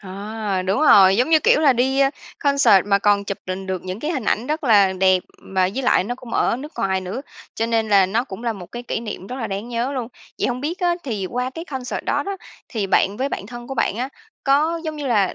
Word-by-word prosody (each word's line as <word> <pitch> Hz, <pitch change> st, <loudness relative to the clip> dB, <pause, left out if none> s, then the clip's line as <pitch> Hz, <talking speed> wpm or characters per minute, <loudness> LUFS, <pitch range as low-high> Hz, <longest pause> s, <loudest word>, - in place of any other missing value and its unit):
Ờ, 200 Hz, 0 st, -4 dB
đúng 195 Hz, +9 st, 0 dB
rồi, 195 Hz, -9 st, +7 dB
giống 250 Hz, +5 st, +2 dB
như, 315 Hz, -, +7 dB
kiểu, 300 Hz, -, +4 dB
là 285 Hz, -4 st, +5 dB
đi, 265 Hz, +3 st, +1 dB
a, 275 Hz, 0 st, +4 dB, 0.3 s
concert 250 Hz, -9 st, +4 dB
mà 200 Hz, -1 st, +3 dB
còn 200 Hz, 0 st, +2 dB
chụp 200 Hz, -, -4 dB
đình 190 Hz, +1 st, -4 dB
được 185 Hz, -2 st, -3 dB
những 185 Hz, +3 st, -5 dB
cái 305 Hz, -, -2 dB
hình 265 Hz, -9 st, -2 dB
ảnh 230 Hz, +4 st, 0 dB
rất 305 Hz, +1 st, -2 dB
là 200 Hz, -6 st, +5 dB
đẹp, 185 Hz, -1 st, +3 dB, 0.2 s
mà 185 Hz, -1 st, 0 dB
với 270 Hz, -, -2 dB
lại 190 Hz, -, +3 dB
nó 245 Hz, -, -3 dB
cũng 245 Hz, -1 st, -12 dB
ở -, -, +2 dB
nước 295 Hz, +4 st, -8 dB
ngoài 190 Hz, -1 st, 0 dB
nữa, 185 Hz, +8 st, -5 dB, 0.3 s
cho 225 Hz, -, -1 dB
nên 225 Hz, -1 st, 0 dB
là 195 Hz, -2 st, +5 dB
nó 225 Hz, +6 st, 0 dB
cũng 230 Hz, 0 st, -9 dB
là 230 Hz, -, 0 dB
một 185 Hz, -5 st, -9 dB
cái 240 Hz, 0 st, -6 dB
kỷ 235 Hz, -, -3 dB
niệm 210 Hz, -4 st, -7 dB
rất 250 Hz, +5 st, -6 dB
là 230 Hz, -, -3 dB
đáng 200 Hz, +4 st, -5 dB
nhớ 240 Hz, +3 st, -2 dB
luôn. 245 Hz, -4 st, -3 dB, 0.3 s
Vậy -, -, +1 dB
hông 250 Hz, +1 st, -3 dB
biết 330 Hz, +6 st, -3 dB
á, 350 Hz, -1 st, +2 dB
thì 210 Hz, -7 st, -3 dB
qua 250 Hz, +1 st, -2 dB
cái 325 Hz, +5 st, -7 dB
concert 265 Hz, -6 st, -5 dB
đó -, -, 0 dB
đó, 395 Hz, 0 st, -4 dB, 0.3 s
thì 215 Hz, -5 st, -2 dB
bạn 195 Hz, +1 st, +2 dB
với 265 Hz, +3 st, -1 dB
bạn 200 Hz, -, -5 dB
thân 240 Hz, +1 st, -9 dB
của 270 Hz, -, -5 dB
bạn 210 Hz, -, 0 dB
á, 255 Hz, +3 st, -2 dB, 0.4 s
có, 310 Hz, +4 st, +2 dB
giống 310 Hz, -1 st, -4 dB
như 290 Hz, -2 st, -4 dB
là, 205 Hz, -6 st, +2 dB
230 Hz, 265 wpm, -21 LUFS, 195-270 Hz, 0.4 s, rồi